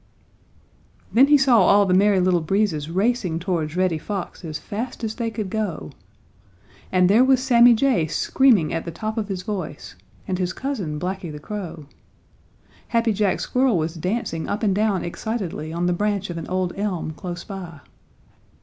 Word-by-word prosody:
Then 260 +4 +6
he 295 0 +6
saw 260 -5 +5
all 200 +2 +5
the 185 - +1
Merry 200 +1 +4
Little 180 -1 +2
Breezes 160 -3 0
racing 190 -2 0
towards 170 -2 -2
Reddy 185 -4 +1
Fox 195 +2 -5
as 155 -2 -4
fast 240 +4 -6
as 220 -1 -2
they 230 0 -2
could 210 -4 -5
go. 195 - -3 1.0
And 180 -1 +4
there 215 +6 +5
was 260 -1 +4
Sammy 240 -2 +6
Jay 225 -9 +2
screaming 225 - +2
at 165 - -2
the - - -6
top 215 +6 -4
of 220 -3 -2
his 190 -3 -4
voice, 180 -8 -5 0.3
and 185 -2 -2
his 180 0 -1
cousin, 200 - -4
Blacky 180 -1 -4
the 150 - -7
Crow. 170 -2 -7 1.0
Happy 230 -1 +1
Jack 200 -2 0
Squirrel 255 -5 +2
was 160 0 -1
dancing 175 -1 -3
up 210 +3 -2
and 200 -3 +3
down 205 -2 +1
excitedly 175 -4 -4
on 170 +2 -2
the 180 - +2
branch 205 0 -1
of 170 - -6
an 165 - -7
old 185 -1 -1
elm 195 -6 -2
close 175 +2 -7
by. 175 -7 -8
190 Hz, 175 wpm, -22 LUFS, 170-220 Hz, 1.0 s, Then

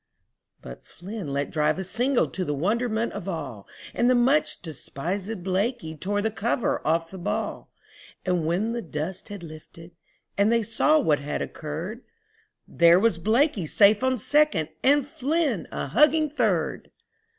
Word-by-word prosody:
But 60 0 -10
Flynn 185 -3 -8
let 140 +1 -2
drive 150 +1 +1
a 190 - -3
single 245 +8 +1
to 190 - -4
the 150 -4 -2
wonderment 220 - 0
of 195 -1 -5
all, 135 - -6 0.3
And 240 - +2
the 255 - +4
much 260 +5 +2
despisèd 180 +6 -5
Blakey 190 -2 -1
tore 205 +5 -2
the 220 - 0
cover 225 +2 -1
off 165 +1 0
the 190 - -8
ball, 210 +4 -3 0.5
And 180 -3 +1
when 195 +7 0
the 235 0 -3
dust 165 +2 -5
had 205 -3 -8
lifted 165 +1 -12 0.5
and 205 +2 +4
they 230 -1 +2
saw 265 +8 +3
what 155 - +2
had 145 +1 -3
occurred, 165 +10 -6 0.7
There 170 +1 +5
was 210 -5 +2
Blakey 220 - +1
safe 205 +5 +5
on 260 0 +2
second, 235 - +2
and 285 +1 +3
Flynn 285 - -1
a - - -3
hugging 300 - +3
third. 215 - -1
200 Hz, 155 wpm, -25 LUFS, 165-235 Hz, 0.7 s, There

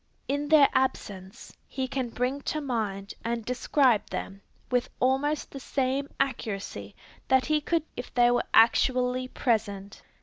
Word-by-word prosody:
In 285 +1 -1
their 300 -3 +7
absence, 200 -7 -3
he 265 -1 -3
can 260 -2 -3
bring 250 +4 -2
to 305 - -2
mind 215 -8 -3
and 230 -1 -2
describe 250 -2 +2
them, 195 0 -6 0.3
with 245 -1 +1
almost 275 +4 0
the 275 - -7
same 270 +1 -1
accuracy 200 - -3 0.3
that 260 -1 +3
he 305 0 +1
could 330 +1 0
if 245 - -7
they 240 -1 +4
were 245 - +1
actually 250 +2 +3
present. 210 -6 -2
255 Hz, 140 wpm, -27 LUFS, 225-275 Hz, 0.3 s, their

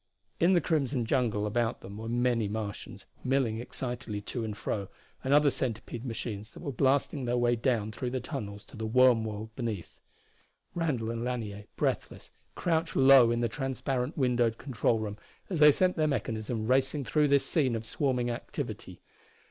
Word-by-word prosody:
In 175 +3 +5
the 175 - +4
crimson 140 -6 0
jungle 110 -4 +1
about 115 +2 0
them 100 +2 -9
were 115 +1 -5
many 120 -2 +1
Martians, 105 -1 -5 0.2
milling 130 -4 +1
excitedly 120 -3 -4
to 115 +3 -4
and 105 -2 -4
fro, 100 -2 -3 0.4
and 130 - -1
other 145 0 +6
centipede 120 -1 -4
machines 110 -2 -5
that - - -13
were 140 - -3
blasting 135 +1 +1
their 120 0 +1
way 120 0 +3
down 115 -3 0
through 125 +3 -3
tunnels 105 -8 -6
to - - -14
the 110 0 -3
worm 125 -1 +5
world 110 +1 -6
beneath. 115 -8 -4 0.7
Randall 135 -10 -1
and 115 0 -3
Lanier, 110 -5 -4
breathless, - - -2 0.2
crouched 165 -2 0
low 135 -3 +7
in 120 0 +1
the 120 - +2
transparent 130 +2 -2
windowed 120 -4 +2
control 120 -3 0
room 105 -1 -4 0.3
as 175 - -1
they 150 0 +9
sent 185 +5 +2
their 155 -1 +3
mechanism 110 -3 -2
racing 135 +3 +1
through 150 +2 +3
this 140 -1 +3
scene 135 -7 +1
of 115 0 -4
swarming 125 0 0
activity. 120 - -6
120 Hz, 170 wpm, -30 LUFS, 110-135 Hz, 0.7 s, they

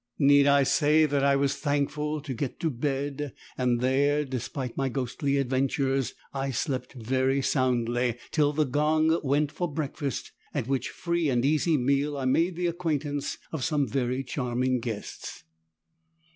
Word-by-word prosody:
Need 140 0 +5
I 140 0 +5
say 150 +3 +4
that 140 -2 0
I 140 0 +4
was 140 0 +1
thankful 150 +1 -1
to 140 -2 -5
get 130 +2 -4
to 160 - +1
bed 140 +2 -3 0.2
and 125 -2 +1
there, 145 +3 +2
despite 130 0 -4
my 135 -1 0
ghostly 135 +2 -1
adventures, 135 0 0 0.2
I 135 0 -2
slept 130 0 -2
very 130 +2 0
soundly 120 -2 +1
till 150 -2 +3
the 150 +1 +1
gong 155 +4 +2
went 145 +1 +1
for 175 -1 -3
breakfast, 145 -2 -3 0.2
at 140 -6 0
which 135 -3 -1
free 170 -3 -1
and 125 -1 +1
easy 155 +2 +3
meal 140 +3 +1
I 135 - -3
made 165 +7 +2
the 175 +1 -2
acquaintance 155 -5 -2
of 155 -5 -3
some 145 -2 +1
very 130 +2 -1
charming 125 -1 -1
guests. 115 -3 -6
140 Hz, 155 wpm, -27 LUFS, 130-150 Hz, 0.2 s, Need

